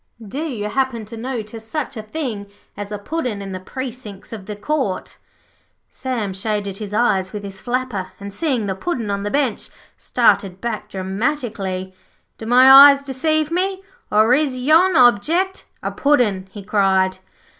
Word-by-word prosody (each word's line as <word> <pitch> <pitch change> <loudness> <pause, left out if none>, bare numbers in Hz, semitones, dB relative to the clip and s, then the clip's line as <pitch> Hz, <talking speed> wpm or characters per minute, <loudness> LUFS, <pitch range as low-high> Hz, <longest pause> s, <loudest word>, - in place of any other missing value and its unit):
Do 270 +9 -5
you 225 -9 -3
happen 240 -1 -1
to 215 - -10
notice 225 -2 -5
such 275 +4 -4
a 220 - -5
thing 215 -4 -5 0.3
as 205 0 -7
a 210 - -3
Puddin' 250 -1 -3
in 195 -1 -6
the 185 - -5
precinks 230 -2 -8
of 205 -4 -8
the 210 - -5
Court?' 215 -3 -2 0.8
Sam 235 -7 -3
shaded 200 0 -3
his 210 -2 -6
eyes 195 -4 +1
with 205 -1 -6
his 195 -1 -8
flapper 245 -6 -2
and, 200 0 -8
seeing 260 -6 0
the 195 - -1
Puddin' 230 - -3
on 200 0 -2
the 205 - -2
bench, 270 -4 -1 0.3
started 190 -2 +2
back 215 -2 -4
dramatically. 195 -2 -3 0.5
'Do 220 - -7
my 265 +3 +10
eyes 280 0 +2
deceive 305 +3 0
me, 380 +2 -1 0.3
or 215 +3 +4
is 275 -2 +1
yon 320 +8 +4
object 315 - +3 0.2
a - - -2
Puddin'?' 225 -10 +1
he 200 +1 -10
cried. 190 -2 +2
225 Hz, 160 wpm, -20 LUFS, 200-270 Hz, 0.8 s, my